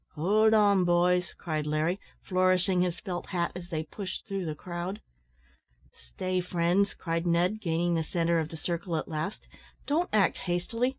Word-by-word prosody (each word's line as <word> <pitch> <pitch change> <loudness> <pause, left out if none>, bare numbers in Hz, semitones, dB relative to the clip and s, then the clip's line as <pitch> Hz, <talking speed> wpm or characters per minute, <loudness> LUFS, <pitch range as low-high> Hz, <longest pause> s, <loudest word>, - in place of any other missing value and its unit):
"Howld 215 +7 +4
on, 200 -3 +5
boys," 175 0 +2
cried 155 -3 -3
Larry, 155 +5 0 0.2
flourishing 185 0 +2
his 180 -1 0
felt 175 -2 -5
hat 170 -2 -1
as 175 -1 -8
they 160 -3 -2
pushed 190 +4 -6
through 195 -3 -3
the 155 -2 -3
crowd. 175 +4 -5 0.9
"Stay, 185 - -3
friends," 180 +3 +1
cried 165 0 -2
Ned, 180 +5 +2
gaining 170 -1 +1
the 165 -1 +1
centre 170 +1 +1
of 160 -1 -2
the 160 - -8
circle 170 +1 -3
at - - -3
last; 155 +5 -4 0.4
"don't 330 +5 +1
act 200 -3 +3
hastily. 185 +8 0
175 Hz, 165 wpm, -29 LUFS, 165-190 Hz, 0.9 s, on